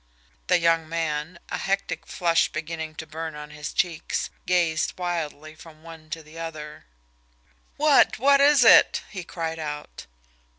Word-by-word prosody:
The 180 - +4
young 165 -1 +2
man, 160 0 -3
a - - -3
hectic 195 +1 -2
flush 170 -2 +1
beginning 160 0 -5
to 160 - -7
burn 160 0 -6
on 150 0 -9
his 150 0 -6
cheeks, 170 -3 -1 0.2
gazed 170 -3 +1
wildly 155 -4 -4
from 160 0 -15
one 165 -1 -12
to 160 0 -6
the 155 +2 -12
other. 155 -2 -7 0.9
"What 295 -1 +4
what 280 +3 +4
is 285 -2 +6
it?" 225 - +6
he 185 -3 -6
cried 165 -1 -5
out. 150 - -7
165 Hz, 145 wpm, -25 LUFS, 155-175 Hz, 0.9 s, is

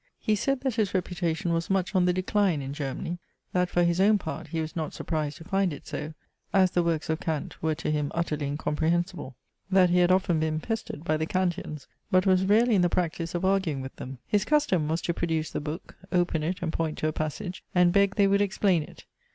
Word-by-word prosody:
He 215 - 0
said 275 +6 0
that 265 -2 0
his 205 -3 +1
reputation 175 -2 -1
was 165 0 -1
much 195 0 0
on 185 -2 +3
the 180 - +4
decline 185 -2 +1
in 135 +1 -5
Germany. 145 +4 -4 0.3
That 180 0 +2
for 175 - +2
his 170 +1 +2
own 210 +2 +5
part 160 -3 -6
he 165 +1 -3
was 155 0 -4
not 160 -3 -3
surprised 155 -2 -2
to 165 - -11
find 195 +1 +1
it 145 - -8
so, 155 +1 -5 0.4
as 185 -2 +4
the 175 - +2
works 165 -2 0
of 160 0 -1
Kant 155 -3 -4
were 160 -1 +1
to 150 - -2
him 150 -1 -1
utterly 155 -4 -1
incomprehensible 160 +1 -1 0.3
that 185 -2 +5
he 180 - +4
had 180 0 +4
often 185 -3 +2
been 155 0 0
pestered 220 -5 -4
by 155 -2 +1
the 160 +1 -2
Kanteans; 175 -5 -2 0.2
but 185 +1 +3
was 190 -1 +4
rarely 225 +4 +4
in 195 - +4
the 175 - +3
practice 170 -1 -1
of 175 +2 -1
arguing 190 -8 +1
with 130 0 -8
them. 130 +1 -7
His 205 -2 +1
custom 240 - +2
was 160 +2 -1
to 170 - 0
produce 160 -2 -1
the - - -3
book, 150 +3 -6 0.2
open 175 -3 +1
it 175 +4 -2
and 165 -1 -2
point 160 -2 -2
to 155 - 0
a 155 - -1
passage, 175 +5 -4
and 180 -1 +5
beg 200 0 +3
they 200 - +4
would 200 +1 +3
explain 195 -3 +2
it. - - -11
175 Hz, 230 wpm, -27 LUFS, 155-190 Hz, 0.4 s, own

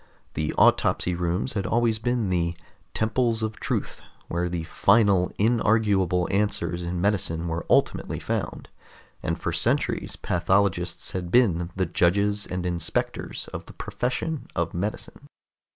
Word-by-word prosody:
The 75 0 -1
autopsy 90 - +3
rooms 85 +7 -1
had 100 -3 -2
always 115 -1 +2
been 120 -4 0
the 85 -1 0 0.4
"Temples 115 0 +1
of 110 0 -3
Truth" - - -3 0.3
where 85 +1 -1
the 85 -2 -3
final, 100 +1 +3
inarguable 105 -5 +2
answers 90 -4 0
in 85 0 -3
medicine 85 -4 0
were 80 0 -3
ultimately - - +2
found, - - -3 0.5
and - - -2
for - - -2
centuries - - 0
pathologists 90 -1 0
had 90 -3 -4
been 85 -7 +3
the 95 -1 +1
judges 100 +5 +1
and 90 0 -3
inspectors 85 -2 -2
of - - -6
the - - -11
profession 130 +5 -3
of 85 -1 -1
medicine. 100 +5 -5
95 Hz, 135 wpm, -25 LUFS, 85-110 Hz, 0.5 s, autopsy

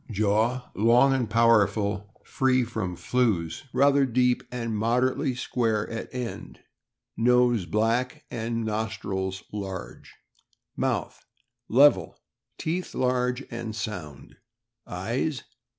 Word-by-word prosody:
Jaw 110 +4 0
long 120 +6 +4
and 125 -4 0
powerful, 105 -3 +2
free 130 -1 +2
from 110 -6 -4
flews, 105 -7 0
rather 140 +2 +4
deep, 125 -1 +2
and 115 -3 -3
moderately 125 +5 +1
square 115 -4 -1
at 115 - -5
end. 125 -2 -6 0.6
Nose 120 -4 +3
black, 115 +7 0
and 115 -1 -2
nostrils 95 -4 -3
large. 95 -3 -7 0.6
Mouth. - - -2 0.3
— 120 0 -59
Level; 95 - +5 0.4
teeth 175 +3 -3
large 125 0 0
and 120 -2 -5
sound. 95 -10 -6 0.5
Eyes. 120 - -2
115 Hz, 105 wpm, -26 LUFS, 105-125 Hz, 0.6 s, Level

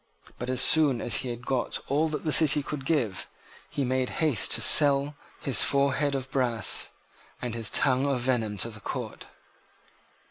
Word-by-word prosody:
But, 125 - -5
as 130 0 0
soon 145 -6 +4
as 115 -3 0
he 130 - -3
had 120 +1 -8
got 130 -2 -1
all 150 +4 0
that 150 - -5
the 155 - -1
city 150 0 +4
could 135 -2 -7
give, 120 - -1 0.4
he 140 - -3
made 130 0 -1
haste 150 -10 0
to - - +2
sell 140 -1 +4 0.3
his 130 -6 +3
forehead 140 +1 +1
of 135 0 -6
brass 120 -5 0 0.5
and 125 -2 -5
his 115 -3 -2
tongue 130 +1 +1
of 135 -3 -1
venom 115 -5 -2
to 115 - -7
the 110 -1 -13
Court. - - -7
130 Hz, 175 wpm, -26 LUFS, 120-145 Hz, 0.5 s, soon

